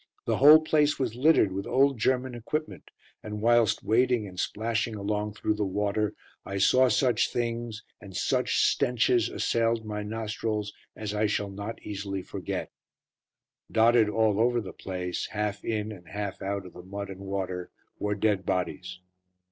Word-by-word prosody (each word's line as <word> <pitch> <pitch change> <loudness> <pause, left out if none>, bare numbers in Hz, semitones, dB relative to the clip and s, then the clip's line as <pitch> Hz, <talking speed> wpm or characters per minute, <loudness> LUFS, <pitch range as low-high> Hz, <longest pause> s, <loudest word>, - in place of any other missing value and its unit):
The - - +1
whole 150 +3 +9
place 150 -1 +2
was 125 -5 -1
littered 130 -5 +4
with 95 +1 -4
old 135 -1 +3
German 130 +2 +1
equipment, 150 +7 -4 0.3
and 105 0 -6
whilst 115 -2 +3
wading 120 -1 +2
and 90 -1 -9
splashing 115 +1 -1
along 105 0 -2
through 110 - 0
the 105 0 -2
water 105 +2 -1 0.3
I 100 - -5
saw 130 +6 +5
such 120 +1 +2
things, 115 -2 -3 0.2
and 95 -3 -8
such 130 -1 +1
stenches 120 -3 +2
assailed 115 -1 0
my 105 -1 -4
nostrils, 105 -1 -3 0.2
as 105 -1 -4
I 105 +1 +1
shall 100 -1 -1
not 100 +3 -6
easily 100 -2 -4
forget. - - -5 1.0
Dotted 115 -1 +4
all 110 -1 +2
over 120 +1 +3
the 100 -5 -7
place, 90 -2 -4
half 105 -1 -3
in 110 -1 -2
and 90 -5 -11
half 100 0 -5
out 100 0 -3
of 90 - -11
the 90 - -10
mud 100 +2 -6
and 95 - -9
water, 95 -2 -4 0.3
were 105 0 -1
dead 100 -2 +1
bodies. 90 0 -3
105 Hz, 160 wpm, -28 LUFS, 100-120 Hz, 1.0 s, whole